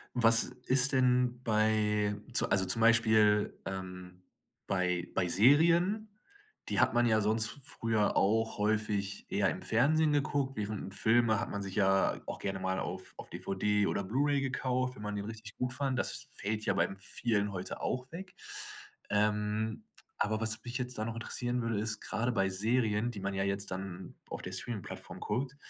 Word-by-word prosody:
Was 115 -1 +5 0.2
ist 130 +2 +3
denn 125 -1 +2
bei 105 -2 +2 0.2
zu - - +2
also 95 0 +2
zum 115 +4 +1
Beispiel, 110 -2 +4
ähm, 90 -1 -7 0.5
bei 90 -2 0
bei 90 - +1
Serien 170 - +4 0.6
die - - +2
hat - - +3
man 120 0 +3
ja 110 -2 +3
sonst 110 +1 +3
f 140 - -6
früher 115 -5 0
auch 110 +3 +2
häufig 105 -1 0
eher - - +2
im - - -4
Fernsehen 150 +7 +3
geguckt, 140 -2 0
während 105 0 -3
'n - - -7
Filme 110 +1 +3
hat - - -3
man 100 - -4
sich 95 -1 -6
ja 95 -1 +2
auch - - -6
gerne 95 -1 -3
mal 95 0 -1
auf - - -5
auf - - -10
DVD 105 +1 0
oder 100 - -1
Blu-ray 140 +8 +1
gekauft, 130 -1 -1
wenn - - -11
man 105 0 -3
den 100 - -3
richtig 110 0 -9
gut 125 0 -2
fand. 135 -1 -1
Das - - -1
fällt 110 +1 -2
ja - - +2
beim 95 - 0
vielen 105 +2 0
heute 90 0 -5
auch 130 +1 -3
weg. 185 +2 -9 0.7
Ähm, 105 +1 0 0.3
aber 110 +1 0
was 110 0 +2
mich 120 +1 -3
jetzt 125 -1 -4
da 110 - -2
noch 115 - -3
interessieren 120 +1 -2
würde, 115 -3 -1
ist, 110 0 -1
grade 120 +3 -1
bei 95 -3 +1
Serien, 110 +3 0
die 105 - -7
man 100 +1 -2
ja 95 0 -1
jetzt 100 0 -2
dann 95 0 -6
auf - - -5
der 90 - -6
Streamingplattform 100 +2 -6
guckt, 130 +6 -2
110 Hz, 180 wpm, -32 LUFS, 100-125 Hz, 0.7 s, Was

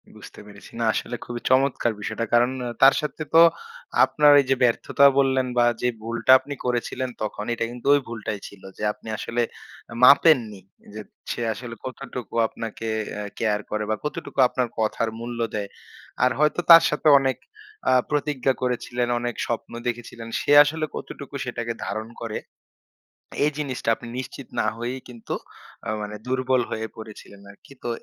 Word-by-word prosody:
বুঝতে - - -13
পেরেছি, 100 -1 -14
না 115 - +1
আসলে 120 - -3
খুবই 120 -1 -6
চমৎকার 130 -2 +2
বিষয়টা। 115 - -3
কারণ 120 +1 +4 0.2
আ - - -3
তার 135 +1 +8
সাথে 150 0 -5
তো 165 - +8 0.6
আপনার 150 -1 +5
এইযে 135 0 +1
ব্যর্থতা 125 +3 +3
বললেন 130 -1 +2
বা 120 - +5 0.2
যে 125 - +1
ভুলটা 115 +3 +1
আপনি 145 +2 -7
করেছিলেন, 125 +1 -2
তখন 105 0 -4
এটা 115 - -2
কিন্তু 120 +1 -8
ওই - - +3
ভুলটাই 110 -2 -5
ছিল। 100 - -15 0.2
যে - - -7
আপনি 105 - -17
আসলে 120 +3 -2 0.5
আ - - -7
মাপেননি 125 - +5 0.3
যে 110 - -6 0.3
সে - - -4
আসলে 115 +1 -8
কতটুকু 130 -4 -7
আপনাকে 115 0 -7 0.3
আ - - -3 0.2
কেয়ার 105 -2 0
করে 105 0 -1
বা 110 - +1
কতটুকু 150 -1 -5
আপনার 125 0 -1
কথার 110 +1 0
মূল্য 120 0 -6 0.2
দেয়। 100 -2 -3 0.5
আর 125 - +4
হয়তো 150 +2 +2
তার 165 0 +11
সাথে 150 +1 -1
অনেক 135 -1 0 0.5
আ - - +5 0.2
প্রতিজ্ঞা 145 -3 0
করেছিলেন, 125 -1 -1
অনেক 120 -1 -3
স্বপ্ন 120 -2 -4 0.2
দেখেছিলেন। 120 -1 -5
সে - - -1
আসলে 155 +2 -2
কতটুকু 140 -1 -8
সেটাকে 120 -1 -3
ধারণ 110 +1 -4
করে। 110 -2 -4 1.1
এই 150 - +3
জিনিসটা 135 -6 -4
আপনি 120 - -11
নিশ্চিত 130 0 -7
না - - +1
হয়েই 120 +3 -4
কিন্তু 120 -2 -6 0.5
আ - - -4
মানে 105 0 -6
দুর্বল 130 0 +1
হয়ে 110 0 -3
পড়েছিলেন 105 -2 -11
আরকি। 100 +7 -17
তো - - -2
120 Hz, 165 wpm, -24 LUFS, 115-130 Hz, 1.1 s, তার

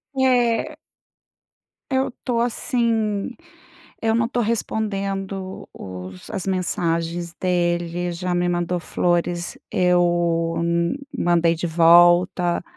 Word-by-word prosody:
É. 245 -3 +2 1.2
Eu 265 0 +1
tô, 245 -3 0
assim, 230 -3 0 0.7
eu 225 0 +1
não 230 0 +1
tô 245 - -3
respondendo 195 -4 -3
os 90 -1 -9
as 190 - -4
mensagens 170 -2 -1
dele, 175 -1 0
já 180 +1 -3
me 175 0 +1
mandou 175 0 -1
flores, 175 0 -1
eu 175 -2 +2
hum 170 0 0 0.2
mandei 170 -1 +3
de 175 - -2
volta. 175 +1 +4
175 Hz, 100 wpm, -22 LUFS, 170-200 Hz, 1.2 s, volta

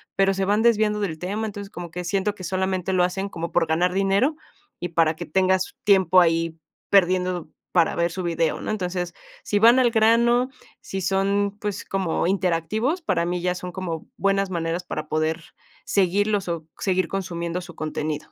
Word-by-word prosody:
pero 195 0 +3
se 195 0 0
van 205 +2 +2
desviando 215 -2 +3
del 170 -6 -2
tema, 205 +6 -3
entonces 200 -1 -7
como 175 -1 -7
que 180 +2 -5
siento 200 +3 -1
que 185 - -10
solamente 190 +1 -1
lo 180 -1 +3
hacen 190 +2 -1
como 170 -1 -5
por 170 -1 +2
ganar 175 +3 +1
dinero, 195 +10 +2 0.4
y 175 - -3
para 160 -1 +2
que 175 - -6
tengas 185 +3 +1
tiempo 185 -3 +5
ahí 165 -1 +1 0.4
perdiendo 180 -3 +2 0.2
para 170 -2 +3
ver 170 0 +1
su 185 - -4
video, 165 -2 0
¿no? - - -5
Entonces, 180 -4 -3 0.3
si 205 - 0
van 235 +4 +6
al 245 -2 +4
grano, 235 +3 +4 0.3
si 190 0 -5
son, 200 +2 0
pues, 205 -2 -4
como 185 -3 -1
interactivos, 195 - 0
para 170 - 0
mí 175 0 -2
ya 180 0 0
son 180 0 -6
como 175 -4 -5
buenas 195 -1 +1
maneras 170 +1 -2
para 155 -3 -5
poder 155 +1 -1 0.4
seguirlos 200 +1 +1
o 165 -2 -4
seguir 185 -3 0
consumiendo 175 -2 -3
su 175 -1 -10
contenido. 155 -1 -4
185 Hz, 180 wpm, -24 LUFS, 170-200 Hz, 0.4 s, van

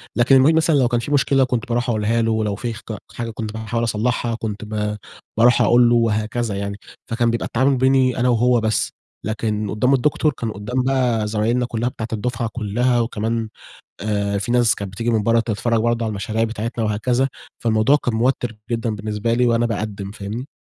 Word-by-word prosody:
لكن 120 +3 +4
المعيد 135 +5 +5
مثلًا 160 -1 +3
لو 130 -3 +4
كان 120 -1 0
في 120 +5 -5
مشكلة 135 -1 +3
كنت 125 -3 -1
باروح 120 +1 0
أقولها 115 +1 +1
له، 115 0 +1
ولو 110 -2 0
في 115 +3 -4
خج 110 -1 -7 0.2
حاجة 115 -1 -4
كنت 110 -1 -5
باحاول 110 +1 -3
أصلحها 115 +1 0
كنت 110 -2 -5
با 105 0 -3 0.4
باروح 120 +2 +5
أقول 120 0 +5
له 120 - +4
وهكذا 110 -1 0
يعني. 100 0 -4 0.3
فكان 115 +1 +1
بيبقى 115 - -2
التعامل 130 +3 +1
بيني 130 0 +3
أنا 125 +1 +2
وهو 120 +1 +3
بس، 110 0 0 0.3
لكن 110 -1 -2
قدّام 125 +6 +2
الدكتور 150 +3 +2
كان 115 -3 -4
قدّام 120 +6 -2
بقى 125 -5 +1
زمايلنا 110 +4 0
كلّها 120 0 -2
بتاعة 110 -3 -6
الدفعة 115 +1 -2
كلّها 120 +3 +1
وكمان، 115 -1 -2 0.5
آآ 100 -1 -1
في 100 +4 -3
ناس 120 -2 +4
كانت 100 -2 -6
بتيجي 115 +4 -2
من 110 -3 +1
برّه 115 +2 +3
تتفرج 115 +1 0
برضه 120 0 0
على - - -1
المشاريع 110 +2 -2
بتاعتنا 115 +1 -3
وهكذا، 120 +5 +1 0.3
فالموضوع 110 +4 +3
كان 120 - 0
موتِّر 120 -1 0
جدًا 115 -1 -1
بالنسبة 105 +2 -2
لي 125 +1 +2
وأنا 120 0 +2
باقدِّم، 105 -3 -4
فاهمني؟ 105 +6 -6
115 Hz, 190 wpm, -21 LUFS, 110-120 Hz, 0.5 s, المعيد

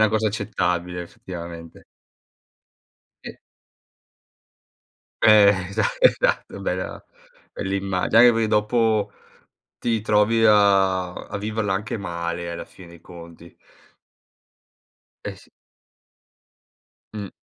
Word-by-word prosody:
una - - +3
cosa 110 0 +1
accettabile 90 -4 -2
effettivamente. 85 -1 -10 1.4
E - - -9 1.8
Eh, 105 -2 +7 0.2
esa 100 - -1 0.2
esatto - - +1
bella - - -4 0.5
bel 95 - -5
immagine, 95 +2 0
anche 120 0 +7
perché 115 -1 0
dopo, 110 0 +1 0.7
ti 115 -2 -1
trovi 105 +2 +2
a 95 -3 +3
a - - -8
viverla 105 -1 -2
anche 105 +3 -4
male 85 -2 -4
alla 85 - -6
fine 90 -2 -16
dei 85 0 -15
conti. 85 -1 -13 1.7
Eh, - - -6
sì. - - -20 1.7
Mh. 100 -2 -5
100 Hz, 95 wpm, -22 LUFS, 90-110 Hz, 1.8 s, Eh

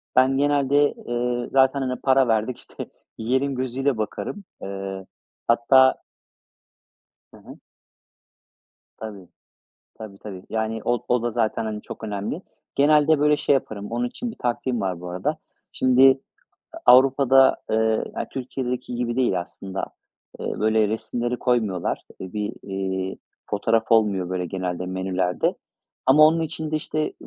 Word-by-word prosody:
Ben 130 +1 +4
genelde, 145 0 +3
ııı, 120 0 -1
"Zaten, 135 +1 +3
hani, 130 -1 -3
para 135 -1 +4
verdik. 115 +2 0
İşte, - - -9 0.3
yiyelim." 130 +4 0
gözüyle 130 0 -1
bakarım. 155 - -4 0.2
Iıı, 95 -1 -6 0.4
hatta 130 +3 +5 1.4
Hı - - -14
hı. - - -13 1.4
Tabii, 100 -5 -9 0.7
tabii, 105 -3 -10
tabii. 95 -3 -9
Yani, 110 0 -2
o 120 -1 0
o 125 -1 +2
da 120 - 0
zaten, 115 -1 0
hani, 105 -1 -4
çok - - -9
önemli. 105 - -4 0.3
Genelde, 150 +2 +4
böyle, 150 +1 +4
şey - - +1
yaparım, 110 -7 -2
onun 120 +1 -1
için 240 - -5
bir - - -11
taktiğim 120 0 -1
var 95 -3 -2
bu 90 - -7
arada. 90 +1 -2 0.3
Şimdi 130 +1 +5 0.5
A - - -8 0.2
Avrupa'da, 135 0 +5
ııı, 110 0 +2
ya, - - -3
Türkiye'deki 125 -1 -4
gibi 120 -1 -2
değil 120 -9 +2
aslında. 95 +2 -6 0.6
Iıı, - - -4
böyle, 110 0 +3
resimleri 120 +3 -2
koymuyorlar. 110 -8 0 0.2
İii, 95 - -7
bir, 105 -1 -3
iii, 95 -1 -3 0.3
fotoğraf 115 +3 +1
olmuyor, 100 -5 +3
böyle, 90 -1 -2
genelde 90 0 -3
menülerde 95 -1 -1 0.5
ama 150 +3 +6
onun 165 +1 +2
için 160 -1 -4
de, 155 - +1
işte, 155 0 -2
120 Hz, 140 wpm, -23 LUFS, 100-135 Hz, 1.4 s, ama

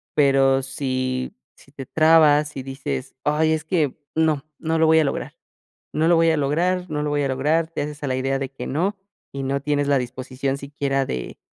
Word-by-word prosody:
pero 135 -2 +4
si 130 -1 -2 0.2
si 135 - -20
te 135 -2 -7
trabas 155 -1 +4
y 135 - -5
dices: 130 - -5
"Ay, 155 +2 +2
es 155 -1 -1
que 160 -6 0 0.2
no 155 -3 +1
no 160 0 -1
lo 160 - +5
voy 160 0 +5
a - - +4
lograr 140 - -3 0.6
no 155 +1 +2
lo 170 - +5
voy 165 0 +4
a 160 - +2
lograr 175 +6 +1
no 150 -1 -2
lo 150 - -1
voy 145 0 +1
a 140 - 0
lograr". 150 +5 +1
Te - - -4
haces 150 0 -6
a 145 - -2
la 130 - -1
idea 135 +1 0
de 135 -1 -4
que 135 - -7
no, 185 +8 -1 0.4
y 140 - -5
no 140 +1 -1
tienes 145 -1 0
la 140 - +4
disposición 130 +2 -3
siquiera 140 -1 -2
de 65 -1 -5
145 Hz, 215 wpm, -22 LUFS, 135-155 Hz, 0.6 s, lo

